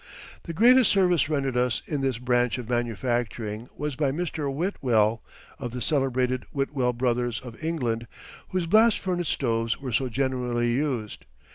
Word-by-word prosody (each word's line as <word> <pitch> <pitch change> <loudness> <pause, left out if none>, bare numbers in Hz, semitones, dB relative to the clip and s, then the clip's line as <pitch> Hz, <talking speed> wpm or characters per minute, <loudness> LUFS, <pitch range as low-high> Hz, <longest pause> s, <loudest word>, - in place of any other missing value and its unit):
The 170 - -5
greatest 245 +6 +6
service 180 -6 +3
rendered 135 -4 0
us 125 -1 +1
in 145 -3 -2
this 135 -3 0
branch 120 -1 +1
of 125 -3 -6
manufacturing 120 -1 -2
was 150 -1 -3
by 140 0 +1
Mr. 155 -2 -2
Whitwell, 120 - +1 0.4
of 120 -4 -5
the 125 - -4
celebrated 130 -2 0
Whitwell 135 -3 0
Brothers 120 -2 0
of 120 +2 -11
England, 120 -8 -1 0.4
whose 185 -2 -1
blast 220 +5 +5
furnace 175 -3 -2
stoves 115 -3 0
were 135 -2 -5
so 130 +3 0
generally 125 -2 0
used. 125 -6 -2
130 Hz, 150 wpm, -26 LUFS, 120-150 Hz, 0.4 s, greatest